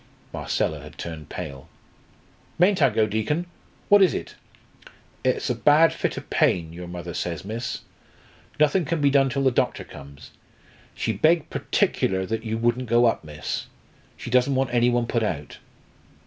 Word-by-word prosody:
Marcella -, -, -1 dB
had -, -, -12 dB
turned 80 Hz, -3 st, -7 dB
pale. 70 Hz, -1 st, -7 dB, 0.9 s
"Mayn't 185 Hz, +3 st, +3 dB
I -, -, +6 dB
go, 110 Hz, -, +2 dB
Deacon? 110 Hz, +11 st, -1 dB, 0.4 s
What 205 Hz, 0 st, +6 dB
is 185 Hz, -5 st, +4 dB
it?" -, -, -5 dB, 0.9 s
"It's 130 Hz, -1 st, 0 dB
a 125 Hz, -, +1 dB
bad 150 Hz, +7 st, +5 dB
fit -, -, -2 dB
of -, -, -7 dB
pain, 80 Hz, -2 st, +1 dB
your 90 Hz, +1 st, -8 dB
mother 85 Hz, 0 st, -6 dB
says, 85 Hz, -1 st, -4 dB
miss. 115 Hz, +3 st, -4 dB, 0.8 s
Nothing 155 Hz, +5 st, +3 dB
can 165 Hz, +1 st, -1 dB
be 140 Hz, -1 st, +3 dB
done 135 Hz, -1 st, +4 dB
till 135 Hz, +2 st, -1 dB
the 130 Hz, -, +4 dB
doctor 120 Hz, -, 0 dB
comes. 70 Hz, 0 st, -13 dB, 0.6 s
She 110 Hz, -, -1 dB
begged 155 Hz, -, +2 dB
particular 95 Hz, 0 st, 0 dB
that 110 Hz, +3 st, -3 dB
you 110 Hz, -1 st, -2 dB
wouldn't 120 Hz, +1 st, 0 dB
go 120 Hz, +1 st, +4 dB
up, 115 Hz, -, +1 dB
miss. 75 Hz, -1 st, -5 dB, 0.5 s
She 120 Hz, -, -7 dB
doesn't 130 Hz, +2 st, +3 dB
want 130 Hz, -2 st, 0 dB
any 120 Hz, 0 st, +4 dB
one 120 Hz, -1 st, +1 dB
put 115 Hz, 0 st, -1 dB
out." 80 Hz, -9 st, -4 dB
120 Hz, 165 wpm, -24 LUFS, 95-140 Hz, 0.9 s, I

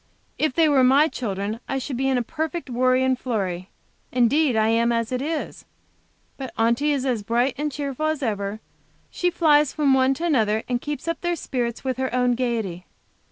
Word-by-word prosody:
If 310 Hz, -4 st, +1 dB
they 330 Hz, -2 st, +4 dB
were 280 Hz, -3 st, +4 dB
my 275 Hz, +4 st, +5 dB
children, 210 Hz, -5 st, -4 dB
I 270 Hz, -, -1 dB
should 265 Hz, 0 st, -4 dB
be 270 Hz, +2 st, 0 dB
in 260 Hz, -, +2 dB
a 245 Hz, -, 0 dB
perfect 315 Hz, +3 st, -4 dB
worry 255 Hz, +1 st, +2 dB
and 260 Hz, -1 st, +1 dB
flurry. 190 Hz, -8 st, -3 dB, 0.4 s
Indeed, 255 Hz, +3 st, +3 dB
I 220 Hz, 0 st, +3 dB
am 230 Hz, +1 st, +2 dB
as 230 Hz, 0 st, -1 dB
it 255 Hz, 0 st, -1 dB
is. 310 Hz, +2 st, -4 dB, 0.7 s
But 265 Hz, -2 st, -6 dB
Aunty 235 Hz, +6 st, +2 dB
is 275 Hz, -2 st, -1 dB
as 245 Hz, -5 st, 0 dB
bright 240 Hz, +5 st, +1 dB
and 295 Hz, +1 st, -2 dB
cheerful 285 Hz, +1 st, -3 dB
as 310 Hz, -2 st, -1 dB
ever. 205 Hz, -2 st, -2 dB, 0.5 s
She 355 Hz, -, 0 dB
flies 300 Hz, -4 st, +3 dB
from 290 Hz, -3 st, +2 dB
one 265 Hz, 0 st, +3 dB
to 335 Hz, -, -3 dB
another, 220 Hz, -9 st, +2 dB
and 245 Hz, -1 st, -1 dB
keeps 295 Hz, +2 st, -5 dB
up 335 Hz, -, -2 dB
their 345 Hz, 0 st, 0 dB
spirits 240 Hz, -6 st, -3 dB
with 260 Hz, -2 st, -2 dB
her 260 Hz, 0 st, -2 dB
own 250 Hz, -1 st, +2 dB
gayety. 225 Hz, -8 st, -2 dB
255 Hz, 200 wpm, -23 LUFS, 230-290 Hz, 0.7 s, my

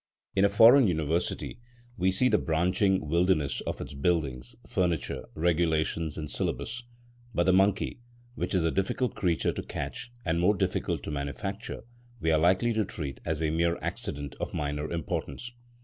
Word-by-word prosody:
In 95 Hz, -, +4 dB
a 100 Hz, -, +6 dB
foreign 115 Hz, +5 st, +7 dB
University 80 Hz, +5 st, -1 dB, 0.4 s
we 95 Hz, -3 st, +2 dB
see 95 Hz, +7 st, +3 dB
the 105 Hz, -4 st, +3 dB
branching 90 Hz, +2 st, +1 dB
wildernesses 85 Hz, -3 st, +2 dB
of -, -, -3 dB
its -, -, -6 dB
buildings, 70 Hz, -5 st, -1 dB
furniture, 85 Hz, -5 st, -1 dB
regulations, 80 Hz, -1 st, +1 dB
and 75 Hz, -1 st, -4 dB
syllabus, 115 Hz, +10 st, -3 dB, 0.5 s
but 85 Hz, -, +3 dB
the 95 Hz, +1 st, +4 dB
monkey, 100 Hz, +5 st, +2 dB, 0.3 s
which 105 Hz, -, -2 dB
is 90 Hz, -, +2 dB
a 80 Hz, -, +2 dB
difficult 100 Hz, +4 st, 0 dB
creature 85 Hz, -4 st, +1 dB
to -, -, -4 dB
catch 120 Hz, -, -5 dB
and 85 Hz, 0 st, +1 dB
more 95 Hz, +4 st, +4 dB
difficult -, -, -1 dB
to -, -, -4 dB
manufacture, 85 Hz, +12 st, -4 dB, 0.4 s
we 80 Hz, 0 st, +1 dB
are 80 Hz, -, +4 dB
likely 95 Hz, +8 st, +3 dB
to 110 Hz, -1 st, +2 dB
treat 75 Hz, -8 st, -6 dB
as 80 Hz, 0 st, -1 dB
a 75 Hz, -, +1 dB
mere 85 Hz, +1 st, +1 dB
accident 70 Hz, -1 st, -4 dB
of -, -, -4 dB
minor 75 Hz, +1 st, -2 dB
importance. 85 Hz, -, -4 dB
85 Hz, 165 wpm, -28 LUFS, 80-95 Hz, 0.5 s, foreign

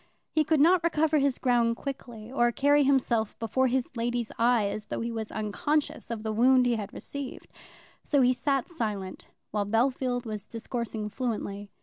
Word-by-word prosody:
He 310 Hz, -, +3 dB
could 310 Hz, 0 st, +2 dB
not 340 Hz, +4 st, +5 dB
recover 315 Hz, -2 st, +2 dB
his 275 Hz, -2 st, +1 dB
ground 240 Hz, -2 st, +2 dB
quickly, 240 Hz, -4 st, -7 dB
or 240 Hz, -3 st, +2 dB
carry 285 Hz, +4 st, +3 dB
himself 245 Hz, -5 st, +1 dB
before 260 Hz, +4 st, +1 dB
his 255 Hz, 0 st, -1 dB
lady's 235 Hz, 0 st, -2 dB
eye 235 Hz, -2 st, +4 dB
as 210 Hz, +1 st, -5 dB
though -, -, -3 dB
he 235 Hz, +1 st, -2 dB
was 220 Hz, -1 st, -4 dB
unconscious 230 Hz, +9 st, -1 dB
of 225 Hz, -2 st, -4 dB
the 220 Hz, -, -2 dB
wound 250 Hz, +3 st, +5 dB
he 240 Hz, -1 st, +2 dB
had 210 Hz, -2 st, -5 dB
received. 280 Hz, -2 st, -7 dB, 0.6 s
So 285 Hz, -3 st, +2 dB
he 250 Hz, 0 st, +5 dB
sat 270 Hz, +1 st, 0 dB
silent, 210 Hz, -, -4 dB, 0.2 s
while 205 Hz, -1 st, -1 dB
Bellfield 245 Hz, +2 st, +1 dB
was 215 Hz, -2 st, -5 dB
discoursing 230 Hz, -2 st, -4 dB
fluently. 210 Hz, -4 st, -4 dB
240 Hz, 175 wpm, -28 LUFS, 220-270 Hz, 0.6 s, not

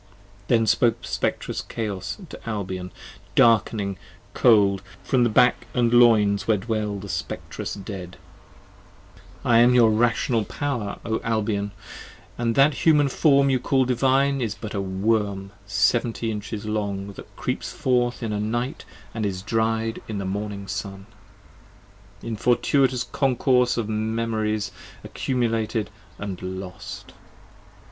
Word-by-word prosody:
Then 115 Hz, -2 st, +3 dB
spoke 115 Hz, +1 st, +3 dB
the -, -, -7 dB
Spectrous -, -, -2 dB
Chaos 100 Hz, -5 st, -4 dB
to -, -, -9 dB
Albion, 95 Hz, -4 st, -4 dB, 0.5 s
dark'ning, 105 Hz, -4 st, +3 dB, 0.4 s
cold, 100 Hz, -5 st, +4 dB, 0.2 s
From 125 Hz, -2 st, +2 dB
the 120 Hz, -, +3 dB
back 120 Hz, +3 st, +3 dB
& -, -, -19 dB
loins 115 Hz, -4 st, +4 dB
where 110 Hz, -2 st, +3 dB
dwell 105 Hz, 0 st, -2 dB
the 100 Hz, +1 st, -8 dB
Spectrous -, -, -5 dB
Dead: 95 Hz, -3 st, -8 dB, 1.3 s
5 -, -, +1 dB
I 115 Hz, -, +7 dB
am 120 Hz, +1 st, +6 dB
your 115 Hz, -3 st, +6 dB
Rational 115 Hz, +1 st, +2 dB
Power, 120 Hz, -4 st, -3 dB
O 110 Hz, 0 st, -1 dB
Albion, 105 Hz, -2 st, -1 dB, 0.4 s
& -, -, -26 dB
that 130 Hz, +5 st, +3 dB
Human 150 Hz, 0 st, +3 dB
Form 140 Hz, -1 st, +4 dB
You 130 Hz, -, +2 dB
call 130 Hz, +1 st, +2 dB
Divine, 135 Hz, +2 st, +2 dB
is 110 Hz, -4 st, -2 dB
but 110 Hz, -, -7 dB
a 100 Hz, -, -1 dB
Worm 100 Hz, 0 st, -1 dB, 0.2 s
seventy 115 Hz, +3 st, +1 dB
inches 105 Hz, 0 st, -5 dB
long 100 Hz, -2 st, -3 dB
That -, -, -13 dB
creeps -, -, -3 dB
forth 125 Hz, -1 st, 0 dB
in 110 Hz, -2 st, -2 dB
a 105 Hz, -, -1 dB
night 120 Hz, +5 st, -2 dB, 0.2 s
& -, -, -25 dB
is 100 Hz, -4 st, -3 dB
dried 115 Hz, 0 st, 0 dB
in 110 Hz, -, -4 dB
the 100 Hz, -, -3 dB
morning 100 Hz, +1 st, -4 dB
sun, 95 Hz, 0 st, -5 dB, 1.2 s
In 115 Hz, -, -3 dB
fortuitous 125 Hz, +2 st, +2 dB
concourse 125 Hz, -2 st, +2 dB
of 115 Hz, -, 0 dB
memorys 110 Hz, -1 st, -1 dB, 0.3 s
accumulated 115 Hz, -4 st, -1 dB, 0.3 s
& 100 Hz, -3 st, -5 dB
lost. 95 Hz, -1 st, -7 dB
110 Hz, 135 wpm, -24 LUFS, 100-120 Hz, 1.3 s, I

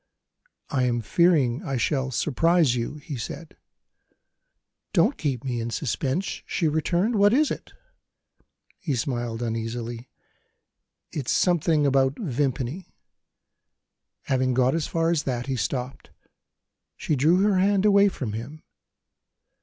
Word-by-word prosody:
"I 130 Hz, -3 st, +1 dB
am 120 Hz, -1 st, 0 dB
fearing 140 Hz, -, +2 dB
I 135 Hz, -2 st, -3 dB
shall 135 Hz, +2 st, 0 dB
surprise 155 Hz, +2 st, +2 dB
you," 120 Hz, +4 st, -3 dB
he 150 Hz, -2 st, -7 dB
said. 115 Hz, -, -7 dB, 1.4 s
"Don't 210 Hz, +11 st, +3 dB
keep 135 Hz, -5 st, -2 dB
me 125 Hz, -3 st, -2 dB
in 115 Hz, -, -3 dB
suspense!" 135 Hz, -, -2 dB
she 165 Hz, -, 0 dB
returned. 175 Hz, +8 st, +1 dB
"What 205 Hz, +2 st, +5 dB
is 295 Hz, +3 st, +3 dB
it?" -, -, -6 dB, 1.1 s
He 150 Hz, -7 st, -2 dB
smiled 120 Hz, -2 st, -3 dB
uneasily: 115 Hz, +1 st, -4 dB, 1.0 s
"It's 140 Hz, -5 st, -3 dB
something 165 Hz, -4 st, +2 dB
about 135 Hz, 0 st, +2 dB
Vimpany." 140 Hz, -, -3 dB, 1.3 s
Having 130 Hz, -1 st, 0 dB
got 130 Hz, +1 st, +3 dB
as 160 Hz, -2 st, -1 dB
far 165 Hz, 0 st, 0 dB
as 165 Hz, -3 st, +1 dB
that, 125 Hz, -4 st, -3 dB
he 135 Hz, -1 st, -2 dB
stopped. 130 Hz, +1 st, -4 dB, 0.9 s
She 155 Hz, -, -1 dB
drew 155 Hz, +7 st, +3 dB
her 200 Hz, -2 st, +3 dB
hand 200 Hz, +1 st, +2 dB
away 200 Hz, -1 st, +6 dB
from 125 Hz, -, -5 dB
him. 130 Hz, +8 st, -7 dB
140 Hz, 125 wpm, -25 LUFS, 125-170 Hz, 1.4 s, away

